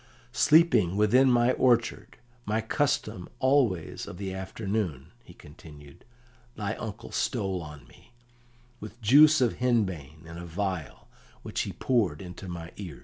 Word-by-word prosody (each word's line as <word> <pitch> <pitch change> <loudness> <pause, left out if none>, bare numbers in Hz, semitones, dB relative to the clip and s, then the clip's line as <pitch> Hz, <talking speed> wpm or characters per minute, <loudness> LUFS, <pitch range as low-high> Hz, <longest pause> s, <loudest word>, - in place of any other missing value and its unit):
"Sleeping 125 - +4
within 125 +6 +4
my 120 0 +3
orchard, 120 -3 +1 0.3
my 110 -1 -1
custom 110 -5 -1
always 130 - +1
of - - -9
the 95 -1 -5
afternoon," 95 - -4
he 85 - -16
continued, 75 0 -15 0.5
"thy 105 0 -3
uncle 110 -4 -7
stole 95 -2 -2
on 75 -2 -11
me, - - -21 0.7
with 110 +3 -10
juice 150 +6 +6
of 120 -3 +1
henbane 95 - -1
in 85 +1 -9
a 85 - -7
vial, 90 -2 -4 0.4
which - - -3
he - - -4
poured 105 - 0
into 95 +1 -9
my 85 -1 -7
ears." 90 -8 -8
100 Hz, 140 wpm, -27 LUFS, 85-120 Hz, 0.7 s, juice